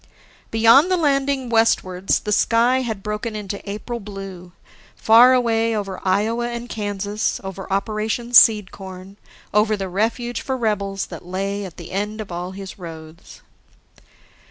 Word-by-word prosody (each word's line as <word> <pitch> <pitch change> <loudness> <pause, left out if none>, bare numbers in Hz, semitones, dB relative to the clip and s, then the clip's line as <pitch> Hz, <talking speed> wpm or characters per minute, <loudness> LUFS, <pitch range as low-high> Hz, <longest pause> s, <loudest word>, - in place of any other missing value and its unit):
Beyond 230 +9 +5
the 370 - +2
landing, 275 -4 +1
westwards, 195 -5 +1
the 210 - -4
sky 240 +5 +3
had 220 -6 -4
broken 210 +1 -4
into 200 -1 -5
April 235 +4 -5
blue, 195 -4 -9 0.4
far 235 +3 +6
away 230 -2 +1
over 195 -2 -5
Iowa 220 +5 +1
and 235 0 -5
Kansas, 205 -1 -2
over 195 0 -7
Operation 215 +4 -2
Seed 215 -5 +6
corn, 190 0 -10 0.4
over 210 +1 +3
the 195 -1 -4
refuge 230 +5 -1
for 265 -1 -3
rebels 200 -4 -1
that - - -8
lay 195 +3 -3
at 180 - -10
the 170 - -9
end 210 +3 -3
of 210 -4 -7
all 175 +1 -4
his 195 0 -9
roads.... 165 -1 -11
210 Hz, 145 wpm, -21 LUFS, 195-230 Hz, 0.4 s, far